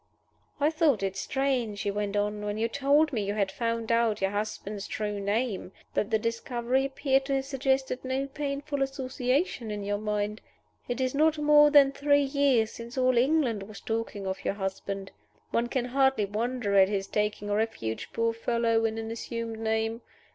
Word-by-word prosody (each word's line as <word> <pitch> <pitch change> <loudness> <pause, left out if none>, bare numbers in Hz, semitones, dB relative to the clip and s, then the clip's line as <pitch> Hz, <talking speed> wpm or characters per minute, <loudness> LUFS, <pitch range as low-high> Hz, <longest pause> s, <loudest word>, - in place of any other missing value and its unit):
"I 295 +2 +3
thought 310 - +2
it 195 -1 -1
strange," 245 -1 -1
he 205 - -1
went 205 0 -2
on, 210 0 -1
"when 205 0 -2
you 225 +1 +1
told 280 +4 +2
me 220 - 0
you 200 +1 -2
had 200 -2 0
found 230 +1 -2
out 230 -2 +2
your 195 0 0
husband's 205 -1 -4
true 210 -1 -3
name, 200 -1 -1 0.2
that 205 - 0
the 220 - +3
discovery 235 +3 -1
appeared 270 0 +1
to 275 0 0
have 270 0 -1
suggested 265 -1 0
no 260 +1 -1
painful 280 0 -3
association 265 -1 -1
to 210 - -2
your 205 0 -2
mind. 210 0 -2 0.5
It 245 +1 -3
is 255 -1 0
not 310 +2 +3
more 295 0 +6
than 285 -2 +6
three 285 +1 +3
years 270 -5 +2
since 235 +2 -9
all 255 -1 +3
England 250 -4 +2
was 200 +1 -9
talking 225 -3 -3
of 190 0 -4
your - - -1
husband. 195 0 -4 0.4
One 235 +1 +1
can 245 0 -1
hardly 265 -3 +2
wonder 220 +1 -2
at 190 -1 +6
his 195 -2 -1
taking 210 0 -1
refuge, 205 - -2
poor 230 0 0
fellow, 230 0 +1
in 220 0 -1
an 225 0 -4
assumed 230 -1 -5
name. 225 +1 -1
230 Hz, 180 wpm, -28 LUFS, 210-270 Hz, 0.5 s, more